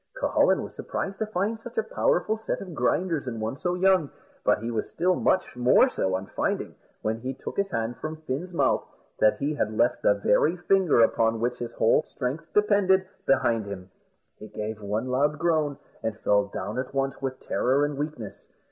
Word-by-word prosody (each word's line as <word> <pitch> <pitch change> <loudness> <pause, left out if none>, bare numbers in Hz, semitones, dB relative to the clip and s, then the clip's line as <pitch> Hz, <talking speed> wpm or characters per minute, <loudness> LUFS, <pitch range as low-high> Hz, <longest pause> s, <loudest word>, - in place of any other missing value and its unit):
Cucullin - - +3
was - - -8
surprised 195 0 -4
to 220 - -1
find 215 +2 -1
such 240 +1 -11
a 220 - +2
powerful 215 -1 +1
set 220 - -3
of 185 -3 -8
grinders 155 +3 0
in 115 -3 -4
one 110 +4 -2
so 180 +3 -1
young; 185 -5 +3 0.3
but - - +3
he 115 +3 -4
was 110 -2 -2
still 185 +1 +1
much 185 -4 +1
more 125 - +5
so 95 - -1
on 95 +1 -3
finding, - - -2 0.3
when 110 +1 -1
he 130 +2 -4
took - - -7
his 200 0 0
hand 115 -5 -2
from 155 +5 -6
Fin's 155 +6 -4
mouth, 170 - +2 0.4
that 110 - +4
he 145 +2 -1
had 110 -7 -2
left 120 - +2
the 100 - +4
very 105 - +2
finger 180 -6 +3
upon 115 0 +2
which 125 +2 -1
his 120 -1 -5
whole 115 +7 +3
strength 140 +5 -5
depended, 200 -2 +3 0.2
behind 115 -5 +2
him. 95 -2 -8 0.5
He 110 - -9
gave 105 +1 -5
one 105 +4 -2
loud 145 +4 +1
groan, 155 -3 +1 0.2
and 110 -1 -3
fell 100 0 +3
down 100 +3 -4
at 130 +1 -5
once 135 0 -1
with 130 -1 -3
terror 135 +3 +1
and 145 0 -3
weakness. 145 -7 -6
135 Hz, 195 wpm, -26 LUFS, 115-180 Hz, 0.5 s, more